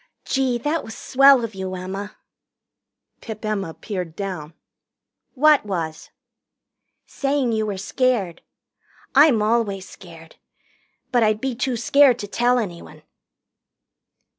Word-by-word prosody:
"Gee, 265 -3 0
that 295 +7 -2
was 220 - -9
swell 275 -1 +5
of 225 -1 -5
you, 190 -1 -5
Emma!" 195 +3 -6 1.0
Pip 220 -1 -8
Emma 195 -6 -3
peered 180 -6 -6
down. 175 -6 -6 0.8
"What 300 +2 +5
was?" 165 -6 -5 1.0
"Saying 275 -3 -1
you 220 -1 -1
were 200 -2 -3
scared. 210 -3 -1 0.7
I'm 275 -6 +5
always 210 -4 0
scared. 165 -3 -14 0.7
But 245 -2 +3
I'd 215 -1 +2
be 265 +2 -2
too 245 +1 -2
scared 270 +2 +4
to 205 - -6
tell 245 +4 +1
anyone." 180 -8 -6
220 Hz, 115 wpm, -22 LUFS, 190-255 Hz, 1.0 s, swell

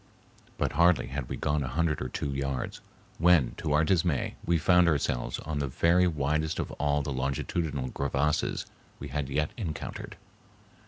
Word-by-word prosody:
But - - 0
hardly 85 +1 +3
had 70 -2 -4
we - - -3
gone 75 0 0
a 65 - -2
hundred 75 +3 0
or 65 - -3
two 70 +3 -3
yards 70 -1 -3 0.4
when 85 -7 +4
to 75 - -2
our 75 +2 +4
dismay 80 -3 +1
we 85 0 +2
found 90 +2 +4
ourselves 65 -6 0
on 75 -1 -4
the 70 - -1
very 85 +7 +3
widest 80 0 0
of - - -3
all 75 0 +2
the 70 - -3
longitudinal 70 +1 -2
crevasses 70 +2 0 0.3
we 70 - -7
had 70 0 -2
yet 75 +2 0
encountered. 85 -10 -5
75 Hz, 165 wpm, -29 LUFS, 70-85 Hz, 0.4 s, when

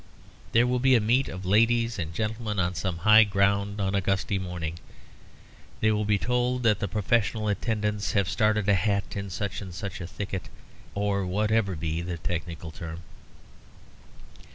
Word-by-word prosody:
There 115 +2 +4
will 125 0 +1
be 130 +1 +5
a - - +5
meet 120 +5 +2
of 95 0 -7
ladies 115 +3 +3
and 85 -2 -3
gentlemen 110 +3 -3
on 90 -1 +1
some 90 0 -3
high 110 +1 +9
ground 100 0 +1
on 95 -1 0
a 100 - +2
gusty 95 +1 0
morning. 85 -3 -5 1.0
They 110 - +3
will 105 0 0
be 105 0 +2
told 125 +3 0
that 105 -3 +3
the 100 - -1
professional 105 +2 0
attendants 105 -1 -1
have 100 -3 +2
started 105 0 +1
a 100 - +5
hat 100 +1 0
in 100 0 -4
such 95 +3 -4
and 95 -3 -7
such 95 0 -6
a 85 - -5
thicket, 95 0 -5 0.5
or 100 -1 0
whatever 105 0 +1
be 80 +1 -2
the 85 0 -4
technical 85 -1 -4
term. 80 +1 -8
100 Hz, 170 wpm, -27 LUFS, 90-110 Hz, 1.0 s, high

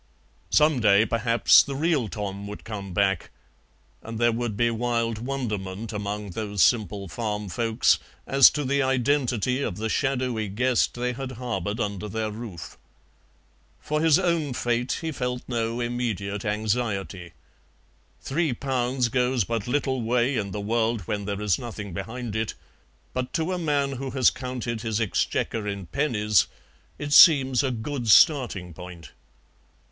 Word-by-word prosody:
Some 150 -3 +4
day 105 -1 +5
perhaps 115 +1 +5
the 140 - -5
real 150 -5 +1
Tom 100 -1 -5
would 105 - -8
come 100 -4 -6
back, 95 -1 0 0.7
and 115 0 -7
there 120 +1 +3
would 115 -2 -3
be 120 +1 +2
wild 115 -1 -1
wonderment 110 -5 -4
among 105 -1 -4
those 105 0 0
simple 105 -4 +1
farm 105 +2 -4
folks 115 +2 +2 0.3
as 135 -1 +7
to 150 - -3
the 140 +2 +1
identity 130 -2 +1
of 90 -9 -3
the 110 +1 -2
shadowy 125 -4 -1
guest 120 +5 +1
they 125 +1 -2
had 130 +1 -6
harboured 110 -4 -3
under 105 -2 -3
their 110 0 -2
roof. 105 -7 -8 1.0
For 150 0 -2
his 160 -2 +5
own 170 -6 0
fate 120 +1 -1
he 165 -1 -3
felt 125 -3 -3
no 115 -1 -2
immediate 115 -5 -3
anxiety; 105 -4 -2 0.9
three 155 0 0
pounds 125 -1 -1
goes 125 0 +1
but 115 +1 -3
little 130 -1 0
way 120 +3 +1
in 105 -4 -2
the 105 - -5
world 115 +1 0
when 100 +3 -4
there 100 0 -3
is 105 -5 +1
nothing 105 -5 -7
behind 115 +4 -5
it, 110 0 -2 0.6
but 125 0 -3
to 165 +3 -1
a 180 - -2
man 145 -4 0
who 135 0 -5
has 130 -2 +3
counted 125 -3 -4
his 110 -2 -1
exchequer 110 0 -1
in 100 -2 -4
pennies 105 - +1 0.5
it 145 0 -3
seems 135 -6 +7
a 135 - 0
good 120 +1 -4
starting 120 - +4
point. 90 -1 -10
115 Hz, 150 wpm, -25 LUFS, 105-130 Hz, 1.0 s, as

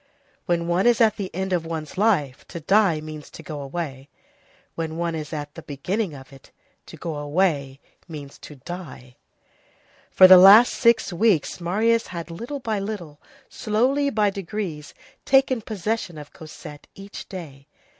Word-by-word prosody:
When 170 -1 0
one 175 +5 +2
is 240 -2 +4
at 225 -2 +3
the 195 -3 -4
end 190 +1 -3
of 175 -2 0
one's 160 -2 -6
life, 185 - +1
to 170 - -7
die 185 -1 +2
means 155 -1 -9
to 160 - -12
go 150 -2 -7
away; 140 -2 -6 0.6
when 160 -1 -4
one 170 0 -2
is 155 -2 -6
at 145 -2 -6
the 165 - -10
beginning 165 +6 -3
of 135 0 -13
it, 135 - -16 0.4
to - - -11
go 160 -3 -5
away 145 -3 -1 0.3
means 145 -4 -10
to 150 - -11
die. 135 -5 -10 0.9
For 185 - +7
the 185 0 +10
last 205 +6 +8
six 235 -5 +2
weeks, 185 -3 +1
Marius 225 +6 +1
had 170 -2 -7
little 240 +12 -6
by 220 -5 -2
little, 190 -8 -6 0.3
slowly, 260 +7 0
by 210 -4 +1
degrees, 190 -5 -6 0.3
taken 270 -3 +3
possession 210 -4 -4
of 150 -1 -11
Cosette 155 -1 -11
each 195 +1 -10
day. 145 -7 -9
175 Hz, 160 wpm, -23 LUFS, 150-210 Hz, 0.9 s, the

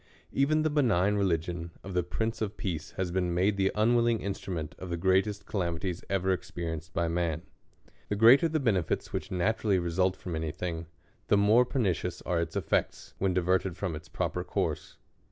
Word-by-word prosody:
Even 155 +3 +2
the 155 - +1
benign 105 - +3
religion 85 -3 -1
of 95 - -7
the 90 - +2
Prince 110 +7 -3
of 105 -1 -2
Peace 85 -5 -3
has 95 -2 -1
been 90 -1 0
made 95 +3 +2
the 95 0 +2
unwilling 120 +2 +3
instmment 95 -6 -4
of 95 - -7
the 85 - -2
greatest 95 +4 +1
calamities 90 -2 -2
ever 95 -1 +1
experienced 85 -3 -4
by 85 +2 0
man. 85 -1 -1 0.7
The 105 - 0
greater 120 +10 +7
the 155 0 0
benefits 100 - 0
which - - -3
naturally 100 +2 +1
result 90 +2 +1
from 90 -2 -6
any 80 0 -2
thing, 85 0 -4 0.4
the 105 - +4
more 110 +5 +5
pernicious 110 - -1
arc 85 -2 0
its 85 0 -4
effects, - - -1
when 95 -2 +1
diverted 90 0 +1
fi'om 90 -4 -3
its 75 - -10
proper - - -2
course. - - -3
95 Hz, 175 wpm, -29 LUFS, 85-105 Hz, 0.7 s, greater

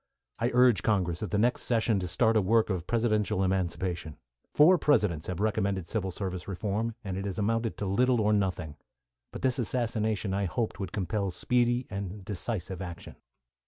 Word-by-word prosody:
I 115 +1 +1
urged 125 -3 +5
Congress 90 -5 0
at 105 - -3
the 105 - 0
next 120 +4 +2
session 115 -3 +1
to 90 - -3
start 110 +6 +2
a 110 - +5
work 110 +3 +2
of 90 -2 -3
presidential 110 -5 +1
emancipation. 90 -4 -2 0.3
Four 170 +4 +6
Presidents 105 - +2
have 95 -2 -4
recommended 100 -4 0
civil 95 0 -2
service 95 -1 -5
reform, 105 +4 -2
and 95 -3 -4
it 95 - -4
has 95 -2 -4
amounted 115 +2 0
to 105 - -3
little 125 +5 +2
or 105 0 +3
nothing. 90 -7 -1 0.5
But - - -8
this 130 -1 +2
assassination 110 -4 -1
I 100 0 0
hoped 105 +4 -2
would 95 -3 -4
compel 100 +1 -1
speedy 120 +5 +1
and 100 -1 -5
decisive 95 -2 -4
action. 90 -2 -8
100 Hz, 175 wpm, -29 LUFS, 95-115 Hz, 0.5 s, Four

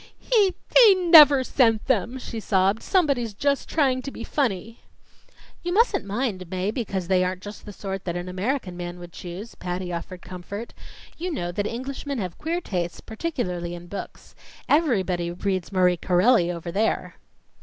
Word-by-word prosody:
"He 415 -6 +2 0.3
he 415 -4 +8
never 310 -7 +8
sent 225 -4 +2
them!" 245 0 0
she 235 -3 -6
sobbed. 195 0 +1
"Somebody's 275 - +1
just 280 +5 0
trying 265 -5 +2
to 275 - -5
be 235 - -8
funny." 230 -5 -2 0.8
"You 350 - -3
mustn't 420 0 +2
mind, 200 -4 -3
Mae, 185 +3 -1
because 195 -7 -3
they 185 -1 +3
aren't 185 0 -3
just 205 0 -9
the - - -6
sort 195 -1 -6
that 175 -2 -2
an 175 +1 -4
American 185 +1 -2
man 175 0 -6
would 175 -1 -11
choose," 185 +6 -8
Patty 180 0 -4
offered 175 +1 -6
comfort. 185 +5 -7 0.5
"You 360 +2 -3
know 175 - -3
that 205 +3 -2
Englishmen 270 +4 -4
have 185 -6 -5
queer 335 +3 -2
tastes, 175 - -3
particularly 180 - -4
in 175 0 -10
books. 195 +3 -8 0.3
Everybody 190 - +1
reads 185 +1 -2
Marie 180 -2 +3
Corelli 180 +2 +3
over 170 0 -6
there." 215 +5 -1
205 Hz, 165 wpm, -24 LUFS, 180-265 Hz, 0.8 s, he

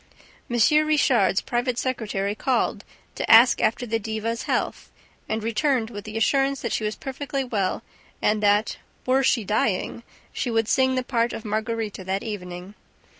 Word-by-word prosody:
M. 240 0 -1 0.3
Richard's 245 -10 +3
private 240 0 -1
secretary 210 -6 -2
called 245 +3 0 0.3
to - - -4
ask 230 +2 +7
after 240 +2 +1
the 225 -1 -1
diva's 220 +2 -3
health - - -1 0.4
and 220 0 -2
returned 230 0 0
with 205 -2 -8
the 215 +1 -5
assurance 270 +4 +1
that 235 - -2
she - - -1
was 215 0 -2
perfectly 275 0 -4
well 205 -7 -2 0.4
and 210 0 +1
that, 205 +1 +2 0.3
"were 260 +1 +3
she 250 -3 +2
dying," 210 +1 -1 0.3
she - - -2
would 225 -1 +1
sing 260 +1 +2
the 255 - 0
part 235 -2 0
of 225 - -7
Margarita 215 -1 -3
that 190 +1 -2
evening. 180 -3 -7
225 Hz, 160 wpm, -24 LUFS, 210-250 Hz, 0.4 s, ask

